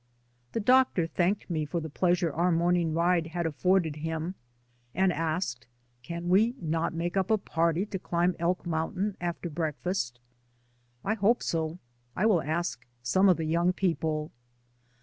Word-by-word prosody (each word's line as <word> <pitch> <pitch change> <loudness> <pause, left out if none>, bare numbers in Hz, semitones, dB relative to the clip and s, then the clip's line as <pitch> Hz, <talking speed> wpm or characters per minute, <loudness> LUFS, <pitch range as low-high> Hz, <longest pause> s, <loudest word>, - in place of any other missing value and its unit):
The - - 0
doctor 250 -6 +4
thanked 180 +4 0
me 160 -4 -1
for 150 +3 -2
the 160 - -5
pleasure 175 0 +1
our 175 +3 +2
morning 170 -1 +2
ride 170 0 +2
had 170 +1 -3
afforded 165 +1 +1
him, 160 +3 -3 0.6
and 190 +1 +3
asked, 155 -6 -2 0.3
"Can 170 +7 -6
we 215 +7 +4
not 165 -1 -1
make 175 +2 -2
up 190 -1 +1
a 220 - +4
party 170 -1 0
to 195 -2 -5
cHmb 175 0 0
Elk 175 +2 0
Mountain 180 +5 -1
after 175 0 -3
breakfast?" 155 -4 -2 0.9
"I 210 - +2
hope 225 +2 +2
so. 160 0 -1 0.4
I 190 - +1
will 200 -7 +4
ask 160 -4 -2 0.2
some 190 +11 +4
of 180 - +5
the 160 - -2
young 170 +3 +2
people." 160 -4 -1
170 Hz, 155 wpm, -28 LUFS, 160-185 Hz, 0.9 s, of